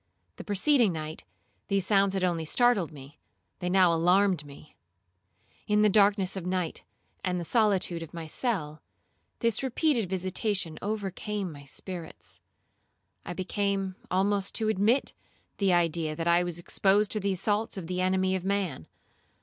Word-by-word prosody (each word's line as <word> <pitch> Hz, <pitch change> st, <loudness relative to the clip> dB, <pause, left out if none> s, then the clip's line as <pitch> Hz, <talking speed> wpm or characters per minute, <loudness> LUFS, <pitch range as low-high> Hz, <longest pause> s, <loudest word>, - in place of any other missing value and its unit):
The -, -, -7 dB
preceding 225 Hz, +2 st, +3 dB
night 155 Hz, 0 st, -6 dB, 0.4 s
these 195 Hz, -2 st, +1 dB
sounds 195 Hz, -1 st, +3 dB
had 190 Hz, -, -1 dB
only 170 Hz, -3 st, 0 dB
startled 210 Hz, 0 st, +2 dB
me; 140 Hz, 0 st, -13 dB, 0.4 s
they 180 Hz, -, -2 dB
now 180 Hz, -2 st, +5 dB
alarmed 180 Hz, 0 st, +3 dB
me. 145 Hz, +1 st, -14 dB, 0.9 s
In 210 Hz, 0 st, +3 dB
the 210 Hz, -, +5 dB
darkness 200 Hz, -2 st, +3 dB
of 190 Hz, -, -4 dB
night, 180 Hz, -2 st, -2 dB, 0.4 s
and 180 Hz, -1 st, -1 dB
the -, -, -3 dB
solitude 195 Hz, -5 st, +1 dB
of 165 Hz, -, -8 dB
my 165 Hz, -1 st, -6 dB
cell, 155 Hz, -, -2 dB, 0.6 s
this 230 Hz, -1 st, +1 dB
repeated 265 Hz, -, 0 dB
visitation 185 Hz, -2 st, -1 dB
overcame 205 Hz, -1 st, -3 dB
my 145 Hz, -2 st, -12 dB
spirits. 170 Hz, +3 st, -8 dB, 0.9 s
I 175 Hz, -, -3 dB
began 195 Hz, +1 st, -1 dB, 0.2 s
almost 195 Hz, +1 st, +1 dB
to 220 Hz, -1 st, +1 dB
admit 220 Hz, +6 st, +2 dB, 0.5 s
the 195 Hz, -2 st, +3 dB
idea 165 Hz, -2 st, +1 dB
that 165 Hz, +2 st, -3 dB
I 170 Hz, +1 st, +4 dB
was 175 Hz, -2 st, -3 dB
exposed 195 Hz, +4 st, +2 dB
to 215 Hz, -, +2 dB
the 200 Hz, -1 st, 0 dB
assaults 205 Hz, +3 st, 0 dB
of 185 Hz, -, -5 dB
the 180 Hz, +2 st, -2 dB
enemy 185 Hz, 0 st, +1 dB
of 185 Hz, -, -3 dB
man. 190 Hz, -, -2 dB
190 Hz, 150 wpm, -28 LUFS, 170-205 Hz, 0.9 s, now